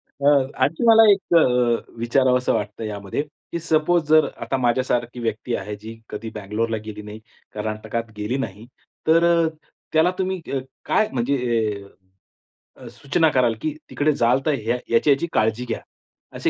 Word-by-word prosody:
अ, 140 Hz, -1 st, +1 dB
आणखी 160 Hz, -, 0 dB
मला 225 Hz, 0 st, +8 dB
एक 195 Hz, -3 st, 0 dB, 0.6 s
अ, -, -, -20 dB
विचारावंस 125 Hz, +1 st, +2 dB
वाटतं 105 Hz, +2 st, -1 dB
यामध्ये 100 Hz, +2 st, -3 dB, 0.3 s
की 170 Hz, -, -2 dB
सपोज 165 Hz, +1 st, +2 dB
जर 155 Hz, 0 st, +6 dB
आता 135 Hz, -, -1 dB
माझ्यासारखी 120 Hz, -1 st, 0 dB
व्यक्ती 115 Hz, +1 st, -2 dB
आहे 105 Hz, +2 st, -5 dB
जी 115 Hz, +1 st, -9 dB
कधी 105 Hz, +2 st, -6 dB
बंगलोरला 110 Hz, +2 st, -2 dB
गेली 105 Hz, -1 st, -7 dB
नाही, 105 Hz, +1 st, -9 dB, 0.3 s
कर्नाटकात 110 Hz, +2 st, -4 dB
गेली 105 Hz, +5 st, -2 dB
नाही, 110 Hz, -4 st, -5 dB, 0.4 s
तर 165 Hz, +1 st, +5 dB
अ, 170 Hz, -1 st, +4 dB, 0.5 s
त्याला 160 Hz, +3 st, +4 dB
तुम्ही 190 Hz, 0 st, -1 dB
क 135 Hz, -, -1 dB, 0.3 s
काय 215 Hz, -, +2 dB
म्हणजे 130 Hz, +3 st, 0 dB, 1.4 s
अ, -, -, -11 dB
सूचना 155 Hz, +3 st, +1 dB
कराल 125 Hz, -4 st, +3 dB
की 155 Hz, -, -2 dB, 0.2 s
तिकडे 150 Hz, +1 st, +1 dB
जाल 125 Hz, -1 st, +2 dB
तर 155 Hz, -, +2 dB
ह्या 120 Hz, +3 st, 0 dB
याची-याची 140 Hz, +6 st, +3 dB
काळजी 110 Hz, +3 st, +1 dB
घ्या. 115 Hz, -, -4 dB, 0.6 s
असे -, -, +1 dB
125 Hz, 155 wpm, -22 LUFS, 110-155 Hz, 1.4 s, मला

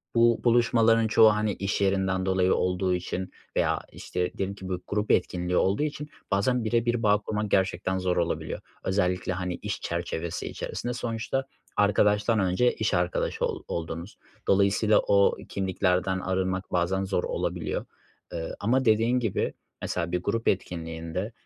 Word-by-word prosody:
bu 115 Hz, 0 st, +4 dB
buluşmaların 115 Hz, -1 st, +4 dB
çoğu, 110 Hz, 0 st, +6 dB
hani, 105 Hz, -1 st, 0 dB
iş 100 Hz, +1 st, -2 dB
yerinden 95 Hz, -1 st, +1 dB
dolayı 95 Hz, -1 st, +3 dB
olduğu 90 Hz, 0 st, +1 dB
için 90 Hz, +1 st, -4 dB, 0.2 s
veya, -, -, +2 dB
işte, 90 Hz, 0 st, -3 dB
diyelim 95 Hz, +1 st, -2 dB
ki 95 Hz, -2 st, -8 dB
bu 90 Hz, -1 st, -3 dB
grup 105 Hz, +1 st, 0 dB
etkinliği 90 Hz, 0 st, +1 dB
olduğu 100 Hz, +9 st, +2 dB
için 150 Hz, 0 st, -4 dB, 0.2 s
bazen 120 Hz, +5 st, +2 dB
bire 115 Hz, +1 st, +1 dB
bir 120 Hz, 0 st, 0 dB
bağ 105 Hz, -1 st, +5 dB
kurman 105 Hz, 0 st, -3 dB
gerçekten 95 Hz, -1 st, +1 dB
zor 90 Hz, -1 st, 0 dB
olabiliyor. 85 Hz, -1 st, -1 dB, 0.2 s
Özellikle, 90 Hz, -1 st, 0 dB
hani, 90 Hz, -1 st, -3 dB
iş -, -, -5 dB
çerçevesi 85 Hz, 0 st, -3 dB
içerisinde 125 Hz, -, -4 dB
sonuçta 120 Hz, +2 st, -2 dB, 0.3 s
arkadaştan 105 Hz, +2 st, +3 dB
önce 95 Hz, +6 st, +2 dB
iş 110 Hz, -2 st, -1 dB
arkadaşı 90 Hz, -1 st, 0 dB
ol -, -, -4 dB
oldunuz. 85 Hz, +3 st, -5 dB, 0.3 s
Dolayısıyla 100 Hz, +2 st, +4 dB
o 100 Hz, 0 st, +4 dB
kimliklerden 95 Hz, -1 st, 0 dB
arınmak 95 Hz, 0 st, -2 dB
bazen 90 Hz, +2 st, +1 dB
zor 95 Hz, -2 st, -1 dB
olabiliyor. -, -, -2 dB, 0.5 s
Eee, 80 Hz, -, -4 dB
ama, 130 Hz, +5 st, +1 dB
dediğin 115 Hz, +3 st, +3 dB
gibi, 115 Hz, -5 st, -1 dB, 0.3 s
mesela, 85 Hz, -1 st, -2 dB
bir 90 Hz, 0 st, 0 dB
grup 115 Hz, +4 st, -1 dB
etkinliğinde, 85 Hz, +2 st, -2 dB
95 Hz, 150 wpm, -27 LUFS, 90-110 Hz, 0.5 s, çoğu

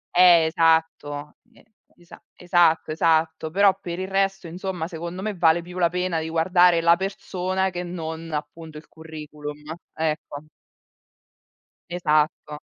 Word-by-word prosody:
Eh, 175 Hz, -2 st, +7 dB
esatto, 160 Hz, -3 st, 0 dB
e -, -, -23 dB, 0.3 s
esa 175 Hz, 0 st, -16 dB
esatto, 175 Hz, -3 st, +2 dB
esatto. 160 Hz, 0 st, +1 dB
Però 195 Hz, +2 st, +3 dB
per 170 Hz, -1 st, -5 dB
il 190 Hz, -, -3 dB
resto, 195 Hz, -1 st, -1 dB
insomma, 180 Hz, -1 st, -5 dB
secondo 170 Hz, +2 st, -7 dB
me 215 Hz, -, -2 dB
vale 170 Hz, -2 st, +2 dB
più 180 Hz, +1 st, -8 dB
la 170 Hz, -1 st, +3 dB
pena 180 Hz, -1 st, -1 dB
di 160 Hz, 0 st, -4 dB
guardare 175 Hz, +1 st, +3 dB
la 170 Hz, 0 st, +5 dB
persona 190 Hz, 0 st, -2 dB
che 175 Hz, 0 st, -4 dB
non 165 Hz, -2 st, -6 dB
appunto 150 Hz, +1 st, -6 dB
il 150 Hz, -, -13 dB
curriculum, 150 Hz, -2 st, -9 dB, 0.4 s
ecco. 155 Hz, -2 st, -3 dB, 1.5 s
Esatto. 155 Hz, -3 st, 0 dB
165 Hz, 130 wpm, -23 LUFS, 160-180 Hz, 1.5 s, Eh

